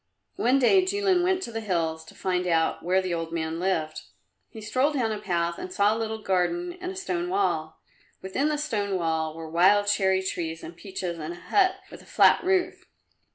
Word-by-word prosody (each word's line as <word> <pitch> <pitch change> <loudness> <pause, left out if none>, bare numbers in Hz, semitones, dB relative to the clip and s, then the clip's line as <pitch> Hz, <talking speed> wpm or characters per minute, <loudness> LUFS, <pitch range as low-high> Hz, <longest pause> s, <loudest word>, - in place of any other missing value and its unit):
One 250 +3 +3
day 370 +9 +5
Jilin 385 -1 +1
went 370 +1 +1
to - - -5
the 225 0 -4
hills 165 -5 -1
to - - -15
find 180 -1 -1
out 165 -2 +1
where 185 +2 +1
the 185 -2 -2
old 165 -1 -3
man 165 0 -3
lived. 165 -4 -1 0.5
He 225 - -10
strolled 255 +7 0
down 235 -5 0
a 215 - -3
path 170 -4 -1
and 185 - -6
saw 205 +3 +2
a - - -4
little 220 -1 -3
garden 340 - 0
and 365 0 -4
a - - -9
stone 355 -2 -3
wall; 395 +2 -1 0.4
within 255 +11 -1
the 300 - 0
stone 210 -10 -2
wall 160 -2 -1
were 165 0 -7
wild 190 +6 +4
cherry 190 -2 +2
trees 165 -3 -4
and 170 - -9
peaches 180 -2 -5
and 155 +2 -5
a 175 - -11
hut 375 - +2 0.2
with - - -11
a - - -19
flat - - +4
roof. 370 -1 0
195 Hz, 205 wpm, -26 LUFS, -, 0.5 s, day